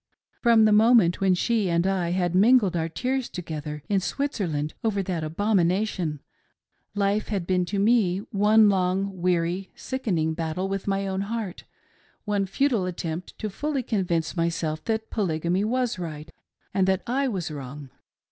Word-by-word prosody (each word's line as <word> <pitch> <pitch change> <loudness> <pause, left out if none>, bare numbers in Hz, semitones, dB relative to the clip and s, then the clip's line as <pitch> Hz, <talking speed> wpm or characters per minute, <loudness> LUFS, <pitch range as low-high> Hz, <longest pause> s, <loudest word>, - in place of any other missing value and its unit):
From 230 -2 +5
the 215 - +4
mof 220 +4 +6
ment 175 -3 +2
when 190 -1 +4
she 215 0 +1
and 170 +1 +1
I 190 -3 0
had 175 -1 0
mingled 205 -1 +4
our 165 -1 -1
tears 255 +7 -2
together, 150 -4 -6
in 200 -2 +2
Switzer 255 -1 -2
land, 150 -1 -2
over 205 -3 0
that 175 -4 -3
abomination, 180 -2 0 0.7
life 205 +1 +1
had 195 -5 -2
been 180 0 +1
to 200 +3 -3
me 200 -3 +3
one 210 +1 +5
long, 190 -1 0
weary, 180 +1 0
sickening 180 -12 -1
battle 165 +3 -2
with 195 0 -4
my 195 0 0
own 190 0 -2
heart, 210 -2 -4 0.6
one 205 -2 0
futile 230 -2 +1
attempt 170 -1 -5
to 215 - -3
fully 275 +6 -2
convince 180 -8 -1
myself 165 -2 -1
that 220 -1 -2
Polygamy 180 -2 0
was 245 -1 0
right 160 -2 -6 0.4
and 190 -1 +2
that 190 -1 +1
I 270 +3 0
was 185 -9 -3
wrong. 140 -1 -8
190 Hz, 160 wpm, -25 LUFS, 170-215 Hz, 0.7 s, mof